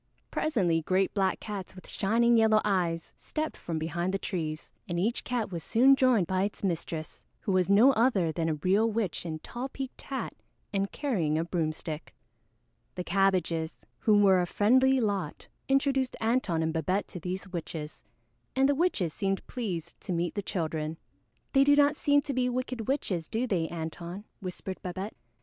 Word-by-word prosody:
Presently 180 Hz, -, +1 dB
great 185 Hz, +4 st, +1 dB
black 195 Hz, -2 st, +1 dB
cats 200 Hz, -4 st, -6 dB
with 185 Hz, -, -12 dB
shining 235 Hz, +4 st, +3 dB
yellow 220 Hz, -1 st, +5 dB
eyes 175 Hz, -5 st, 0 dB
stepped 310 Hz, 0 st, -3 dB
from 165 Hz, -2 st, -4 dB
behind 170 Hz, +3 st, -1 dB
the -, -, +2 dB
trees, 160 Hz, -6 st, -4 dB, 0.2 s
and 170 Hz, 0 st, -1 dB
each 225 Hz, +7 st, 0 dB
cat 235 Hz, -5 st, -2 dB
was 170 Hz, -3 st, -4 dB
soon 265 Hz, +4 st, +5 dB
joined 255 Hz, -8 st, +4 dB
by 185 Hz, +2 st, 0 dB
its 205 Hz, +1 st, -2 dB
mistress, 165 Hz, -3 st, -3 dB, 0.2 s
who 205 Hz, -, -1 dB
was 185 Hz, 0 st, +2 dB
no 220 Hz, +7 st, +7 dB
other 215 Hz, -9 st, +3 dB
than 165 Hz, 0 st, -1 dB
a 155 Hz, -, 0 dB
real 195 Hz, +8 st, +2 dB
witch 210 Hz, -6 st, -2 dB
in 160 Hz, -1 st, -3 dB
tall 245 Hz, +11 st, -6 dB
peaked 265 Hz, -1 st, -7 dB
hat 270 Hz, -, -4 dB, 0.4 s
and 195 Hz, 0 st, 0 dB
carrying 180 Hz, -, 0 dB
a 160 Hz, -, +1 dB
broomstick. 160 Hz, -2 st, -3 dB, 0.8 s
The 180 Hz, -, -3 dB
Cabbages, 175 Hz, -4 st, +1 dB, 0.2 s
who 215 Hz, -2 st, +4 dB
were 190 Hz, -3 st, +5 dB
a 175 Hz, -, -1 dB
friendly 260 Hz, +8 st, +4 dB
lot, 200 Hz, -8 st, -2 dB, 0.2 s
introduced 270 Hz, -1 st, +2 dB
Antone 220 Hz, -8 st, +1 dB
and 160 Hz, 0 st, 0 dB
Babette 185 Hz, +5 st, 0 dB
to 180 Hz, -, -7 dB
these 185 Hz, +3 st, -4 dB
witches, 160 Hz, -3 st, -6 dB, 0.5 s
and 265 Hz, +1 st, +4 dB
the 285 Hz, -, +3 dB
witches 275 Hz, -, +1 dB
seemed 195 Hz, -1 st, -1 dB
pleased 190 Hz, -10 st, -5 dB
to -, -, -5 dB
meet 170 Hz, 0 st, -1 dB
the 205 Hz, -, -2 dB
children. 160 Hz, -4 st, -3 dB, 0.6 s
"They 275 Hz, -1 st, +6 dB
do 285 Hz, +1 st, +6 dB
not 290 Hz, 0 st, +4 dB
seem 285 Hz, -1 st, +3 dB
to 280 Hz, -, -3 dB
be 250 Hz, -1 st, +1 dB
wicked 250 Hz, -2 st, -3 dB
witches, 190 Hz, -, -1 dB
do 230 Hz, +3 st, -1 dB
they, 180 Hz, -9 st, 0 dB
Antone?" 170 Hz, +3 st, -6 dB, 0.2 s
whispered 185 Hz, -1 st, -6 dB
Babette. 190 Hz, +3 st, -5 dB
195 Hz, 175 wpm, -29 LUFS, 170-240 Hz, 0.8 s, no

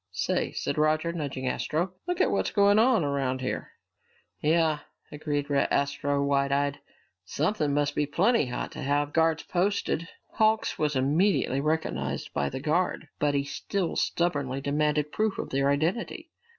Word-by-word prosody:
"Say," 90 Hz, -, -1 dB
said -, -, -2 dB
Roger, 155 Hz, +2 st, +2 dB
nudging 140 Hz, -5 st, -4 dB
Astro, 170 Hz, +7 st, -1 dB
"look 355 Hz, 0 st, -1 dB
at -, -, +3 dB
what's -, -, 0 dB
going 205 Hz, 0 st, +4 dB
on 230 Hz, -5 st, +4 dB
around 135 Hz, -2 st, -1 dB
here!" 130 Hz, -, -4 dB, 0.7 s
"Yeah," 155 Hz, -1 st, +2 dB, 0.3 s
agreed 145 Hz, -1 st, -3 dB
Astro, 140 Hz, 0 st, +1 dB
wide 140 Hz, -1 st, +1 dB
eyed. 140 Hz, 0 st, 0 dB, 0.4 s
"Something 150 Hz, -, 0 dB
must 145 Hz, 0 st, +1 dB
be 150 Hz, -, 0 dB
plenty 190 Hz, -, +2 dB
hot 125 Hz, -, -4 dB
to -, -, -8 dB
have 145 Hz, +1 st, 0 dB
guards 160 Hz, -1 st, +2 dB
posted!" 180 Hz, -3 st, 0 dB, 0.2 s
Hawks 220 Hz, 0 st, +1 dB
was 150 Hz, -1 st, 0 dB
immediately 140 Hz, +1 st, +2 dB
recognized 160 Hz, +2 st, -2 dB
by 70 Hz, 0 st, 0 dB
the -, -, -5 dB
guard, 160 Hz, +2 st, 0 dB
but 145 Hz, -1 st, +1 dB
he 140 Hz, -, +1 dB
still 175 Hz, +5 st, -3 dB
stubbornly 145 Hz, -6 st, 0 dB
demanded 150 Hz, +1 st, 0 dB
proof 215 Hz, -1 st, 0 dB
of -, -, -5 dB
their 140 Hz, +1 st, +2 dB
identity. 160 Hz, +11 st, -1 dB
150 Hz, 150 wpm, -27 LUFS, 140-170 Hz, 0.7 s, going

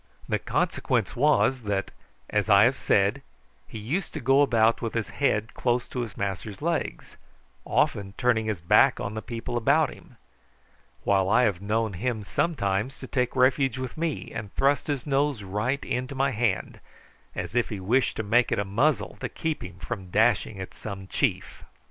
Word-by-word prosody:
The -, -, 0 dB
consequence -, -, -1 dB
was 135 Hz, -2 st, +3 dB
that, 100 Hz, -3 st, -2 dB, 0.4 s
as -, -, 0 dB
I -, -, +7 dB
have -, -, +4 dB
said, -, -, +2 dB, 0.5 s
he -, -, -8 dB
used 150 Hz, -, -3 dB
to -, -, -2 dB
go 135 Hz, +2 st, +4 dB
about 115 Hz, -5 st, +3 dB
with 115 Hz, -1 st, -3 dB
his 110 Hz, -8 st, -1 dB
head 105 Hz, +9 st, 0 dB
close 120 Hz, -1 st, 0 dB
to 125 Hz, -, -4 dB
his 115 Hz, -5 st, -5 dB
master's 100 Hz, +1 st, -4 dB
legs, -, -, -3 dB, 0.5 s
often 100 Hz, -1 st, 0 dB
turning 110 Hz, -3 st, +2 dB
his 105 Hz, -6 st, -2 dB
back 85 Hz, -, +4 dB
on 100 Hz, -, -4 dB
the 110 Hz, -, -4 dB
people 120 Hz, +1 st, -4 dB
about 140 Hz, +6 st, +3 dB
him; -, -, -18 dB, 0.9 s
while 95 Hz, -1 st, +2 dB
I 120 Hz, +4 st, +4 dB
have 100 Hz, -6 st, +1 dB
known 110 Hz, +1 st, 0 dB
him 110 Hz, +3 st, -2 dB
sometimes 110 Hz, -, -1 dB
take 125 Hz, -1 st, 0 dB
refuge 130 Hz, 0 st, +3 dB
with 130 Hz, -2 st, -5 dB
me, 160 Hz, -3 st, -3 dB
and 105 Hz, -3 st, -6 dB
thrust 140 Hz, +1 st, +2 dB
his 145 Hz, -4 st, -2 dB
nose 140 Hz, -5 st, 0 dB
right 105 Hz, +8 st, -2 dB
into 130 Hz, +2 st, -3 dB
my 135 Hz, +1 st, +1 dB
hand, 110 Hz, -5 st, -1 dB, 0.6 s
as -, -, -4 dB
if 120 Hz, -1 st, +1 dB
he 105 Hz, -, -5 dB
wished 120 Hz, +8 st, +1 dB
to 110 Hz, -, -1 dB
make 115 Hz, +4 st, +3 dB
it -, -, +1 dB
a 100 Hz, -, 0 dB
muzzle 115 Hz, +3 st, 0 dB
to -, -, -4 dB
keep 160 Hz, -1 st, -3 dB
him 90 Hz, -2 st, -9 dB
from 90 Hz, +1 st, -6 dB
dashing 110 Hz, 0 st, +2 dB
at 95 Hz, -, -7 dB
some 100 Hz, -2 st, -7 dB
chief. -, -, -2 dB
115 Hz, 180 wpm, -26 LUFS, 100-130 Hz, 0.9 s, I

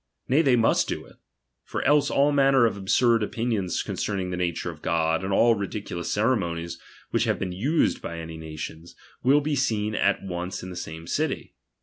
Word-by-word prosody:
Nay, 140 Hz, +5 st, +4 dB
they 135 Hz, -6 st, +4 dB
must 115 Hz, -1 st, +3 dB
do -, -, -4 dB
it; -, -, -18 dB, 0.5 s
for -, -, -4 dB
else 145 Hz, 0 st, +4 dB
all 140 Hz, +1 st, +3 dB
manner 135 Hz, -3 st, +5 dB
of 115 Hz, -, +1 dB
absurd 115 Hz, +4 st, +3 dB
opinions 105 Hz, -4 st, -1 dB
concerning 95 Hz, -3 st, -2 dB
the -, -, -2 dB
nature 85 Hz, -1 st, -2 dB
of 80 Hz, -2 st, -14 dB
God, 80 Hz, +1 st, +1 dB
and 95 Hz, -, -2 dB
all 115 Hz, +4 st, +5 dB
ridi 105 Hz, 0 st, -3 dB
culous 85 Hz, -4 st, -6 dB
ceremonies 85 Hz, -5 st, 0 dB, 0.3 s
which -, -, +2 dB
have -, -, +1 dB
been 90 Hz, -, -3 dB
used 135 Hz, -, +1 dB
by 85 Hz, -, -6 dB
any 80 Hz, 0 st, -7 dB
nations, 80 Hz, +1 st, -8 dB, 0.3 s
will 140 Hz, +4 st, +4 dB
be 150 Hz, 0 st, -1 dB
seen 110 Hz, -5 st, 0 dB
at -, -, +2 dB
ouce 90 Hz, 0 st, -4 dB
in 90 Hz, -, -6 dB
the -, -, -8 dB
same 80 Hz, -1 st, -7 dB
city. -, -, -2 dB
100 Hz, 195 wpm, -25 LUFS, 85-125 Hz, 0.5 s, manner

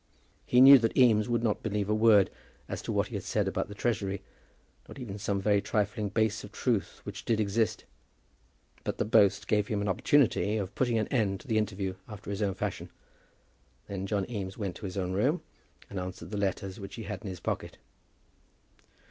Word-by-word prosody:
He 125 Hz, -, +5 dB
knew 135 Hz, +1 st, +11 dB
that 115 Hz, -1 st, -1 dB
Eames 115 Hz, -4 st, +5 dB
would 120 Hz, -1 st, +1 dB
not 110 Hz, -3 st, 0 dB
believe 105 Hz, -2 st, -1 dB
a 105 Hz, -, +1 dB
word 110 Hz, -2 st, +5 dB, 0.4 s
as -, -, -4 dB
to -, -, -4 dB
what -, -, 0 dB
he -, -, -3 dB
said -, -, -1 dB
about -, -, -1 dB
the 105 Hz, -, -9 dB
Treasury, 100 Hz, -4 st, -1 dB, 0.6 s
not -, -, -11 dB
even 105 Hz, -6 st, -6 dB
some 100 Hz, -1 st, -1 dB
very 100 Hz, 0 st, +2 dB
trifling 105 Hz, 0 st, -1 dB
base 110 Hz, +1 st, 0 dB
of 105 Hz, -, -10 dB
truth 115 Hz, -6 st, -1 dB
which 100 Hz, 0 st, -7 dB
did 115 Hz, -3 st, +1 dB
exist; 110 Hz, +1 st, 0 dB, 1.0 s
but -, -, -3 dB
the -, -, 0 dB
boast 100 Hz, -2 st, +4 dB
gave 105 Hz, -1 st, +2 dB
him 105 Hz, -, -1 dB
an 100 Hz, -, -2 dB
opportunity 105 Hz, 0 st, +2 dB
of 100 Hz, -3 st, -4 dB
putting 120 Hz, -3 st, +1 dB
an 110 Hz, -, 0 dB
end 105 Hz, -7 st, +1 dB
to -, -, -17 dB
the 110 Hz, -3 st, +2 dB
interview 100 Hz, -3 st, -2 dB
after 105 Hz, -1 st, -8 dB
his 100 Hz, +1 st, -3 dB
own 100 Hz, -2 st, 0 dB
fashion. -, -, -4 dB, 1.0 s
Then 100 Hz, -1 st, -4 dB
John 100 Hz, -2 st, -1 dB
Eames 100 Hz, -5 st, -5 dB
went 100 Hz, -5 st, -3 dB
to -, -, -8 dB
his 95 Hz, -, -7 dB
own 90 Hz, -1 st, -1 dB
room 135 Hz, -, +1 dB, 0.4 s
and 100 Hz, -, -5 dB
answered 90 Hz, -1 st, -7 dB
the -, -, -3 dB
letters 100 Hz, -1 st, -2 dB
which 100 Hz, 0 st, -8 dB
he 115 Hz, -, -6 dB
had 105 Hz, -3 st, -5 dB
in 105 Hz, -, -7 dB
his 90 Hz, -2 st, -6 dB
pocket. -, -, -4 dB
105 Hz, 200 wpm, -29 LUFS, 100-110 Hz, 1.0 s, knew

